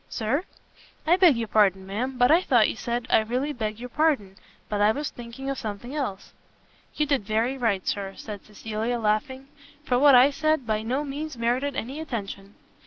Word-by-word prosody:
"Sir?" 260 - -1 0.6
"I 335 +3 +5
beg 355 -8 +5
your 230 -1 -2
pardon, 195 -3 +3
ma'am, 245 +7 -3
but 245 +1 +4
I 335 +3 +6
thought 240 -10 +4
you - - -3
said 235 +1 -3
I - - +6
really 250 +7 -2
beg 215 -4 -4
your 250 +1 -7
pardon, 270 -10 +1 0.3
but 205 -1 -2
I 210 +1 +5
was 290 +5 -3
thinking 240 +3 -9
of 275 -1 -2
something 220 +4 -6
else." 255 -10 -4 0.6
"You 300 - +1
did 280 -6 +1
very 225 +5 0
right, 225 -7 -1
Sir," 195 -1 -2
said 210 -3 -8
Cecilia, 220 +3 -3
laughing, 230 +5 -1 0.4
"for 250 -1 +2
what 280 -1 +7
I 255 +3 +7
said 310 -2 0
by 215 -1 0
no 255 +6 -1
means 295 0 -5
merited 250 +4 0
any 265 +6 -4
attention." 205 -8 -6
240 Hz, 190 wpm, -25 LUFS, 215-275 Hz, 0.6 s, what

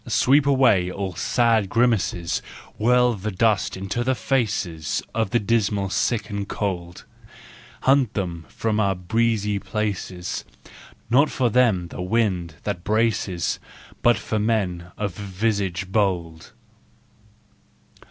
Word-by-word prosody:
Sweep 140 +2 +3
away 125 -10 +4
all 95 0 -4
sad 115 +2 +2
grimaces, 110 -8 +1 0.4
Whirl 125 +2 +4
the 105 0 -4
dust 105 -1 +1
into 100 +5 -2
the 130 +1 +1
faces 100 - -1
Of 110 -2 0
the 120 - +2
dismal 105 -3 0
sick 110 -2 0
and 100 -2 -4
cold! 90 -4 -4 0.8
Hunt 135 -4 +3
them 85 -5 -3
from 110 -1 -1
our 100 -2 +2
breezy 105 +2 0
places, 100 -4 -3 0.7
Not 140 +5 +5
for 125 -3 0
them 105 -8 +3
the - - -7
wind 90 -5 0
that 85 - -3
braces, 105 -4 0 0.4
But 120 -2 +4
for 105 +2 -2
men 95 -6 -1
of 105 -3 -2
visage 95 -2 -2
bold. 90 -6 -1
105 Hz, 120 wpm, -23 LUFS, 90-115 Hz, 0.8 s, Not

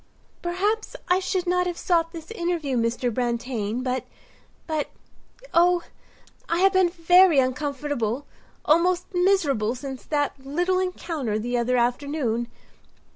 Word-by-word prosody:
"Perhaps 405 +6 -1
I 360 +1 +4
should 370 -1 -1
not 360 0 +1
have 350 -1 -3
sought 330 -2 +1
this 330 +2 -9
interview, 340 - -2
Mr. 235 +1 0
Brantain; 235 -1 -2
but—but, 260 +4 -5 0.6
oh, 350 +1 +4 0.7
I 335 - +1
have 390 0 +5
been 375 -2 +4
very 355 -1 +5
uncomfortable, 275 -2 -1 0.4
almost 345 +3 +3
miserable 315 - +2
since 265 0 -7
that 290 -3 -1
little 355 +7 0
encounter 325 - -2
the 240 +3 -2
other 245 +1 +1
afternoon. 245 -1 0
295 Hz, 120 wpm, -25 LUFS, 250-355 Hz, 0.7 s, have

